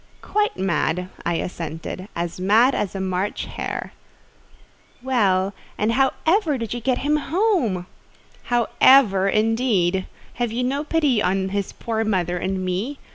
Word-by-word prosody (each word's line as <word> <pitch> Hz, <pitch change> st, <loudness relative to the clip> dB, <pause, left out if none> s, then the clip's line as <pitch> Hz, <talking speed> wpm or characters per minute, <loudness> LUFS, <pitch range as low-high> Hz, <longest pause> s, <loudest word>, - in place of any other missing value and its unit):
"Quite 420 Hz, 0 st, 0 dB
mad," 180 Hz, -1 st, 0 dB, 0.2 s
I 170 Hz, -, +1 dB
assented; 165 Hz, +2 st, -5 dB
"as 170 Hz, +1 st, -3 dB
mad 220 Hz, +8 st, +4 dB
as 200 Hz, -1 st, -2 dB
a -, -, -3 dB
March 190 Hz, +1 st, -2 dB
hare." -, -, -5 dB, 1.1 s
"Well, 200 Hz, -7 st, +2 dB, 0.2 s
and 215 Hz, +2 st, +1 dB
how 265 Hz, +2 st, +2 dB
ever 325 Hz, -4 st, +2 dB
did 230 Hz, -3 st, -4 dB
you 240 Hz, -, -3 dB
get 250 Hz, +2 st, 0 dB
him 300 Hz, +1 st, +3 dB
home?" 300 Hz, -, 0 dB, 0.6 s
"How 240 Hz, -2 st, +1 dB, 0.2 s
ever, 195 Hz, -8 st, +5 dB
indeed! 215 Hz, -4 st, +1 dB, 0.3 s
Have 240 Hz, -2 st, 0 dB
you 240 Hz, +2 st, -1 dB
no 275 Hz, +4 st, -1 dB
pity 295 Hz, -7 st, +1 dB
on 190 Hz, 0 st, 0 dB
his 200 Hz, 0 st, -2 dB
poor 225 Hz, -1 st, -2 dB
mother 180 Hz, -4 st, 0 dB
and 185 Hz, +1 st, -2 dB
me? 200 Hz, +11 st, -2 dB
210 Hz, 145 wpm, -22 LUFS, 185-260 Hz, 1.1 s, ever